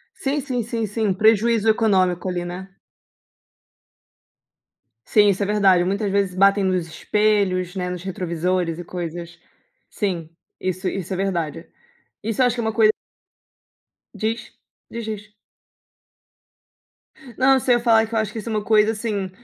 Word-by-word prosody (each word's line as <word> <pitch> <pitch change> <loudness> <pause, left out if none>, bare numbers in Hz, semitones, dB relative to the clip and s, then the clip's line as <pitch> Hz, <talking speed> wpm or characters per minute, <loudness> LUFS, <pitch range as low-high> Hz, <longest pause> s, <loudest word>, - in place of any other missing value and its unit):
Sim, 280 +2 -1
sim, 255 -3 -2
sim, 230 0 -2
sim, 215 +2 -1
um 195 - +2
prejuízo 220 +2 +3
econômico 190 -5 +2
ali, 175 -1 -3
né? 185 +2 -8 2.3
Sim, 210 -1 +4
isso 200 +1 +1
é - - 0
verdade, 195 -3 +4
muitas 200 +2 -1
vezes 200 -2 +1
batem 195 +2 +4
nos 185 -3 0
espelhos, 195 -1 0
né, 180 -1 -2
nos 180 -1 -5
retrovisores 180 -2 -2
e - - -5
coisas. 175 -1 -6 0.5
Sim, 175 -6 -3 0.3
isso 185 +1 -3
isso 190 -1 -3
é 185 - -3
verdade. 170 -4 -3 0.5
Isso 225 +3 -1
eu - - +6
acho 245 - -1
que 235 - -2
é - - -3
uma 220 -1 -1
coi 220 -1 +5 1.3
Diz. 225 +1 -3 0.4
Diz, 230 -1 -5
diz. 210 -1 -6 2.1
Não, 265 +1 +5
eu 265 - +4
sei, 250 -1 +3
eu 240 - +1
ia - - -11
falar 225 -2 +4
que 225 - -6
eu - - +3
acho 215 -1 -2
que 225 - -4
isso 220 - -6
é - - -3
uma 215 -1 -1
coisa, 215 0 +4
assim, 210 -4 -3
200 Hz, 165 wpm, -22 LUFS, 180-220 Hz, 2.3 s, eu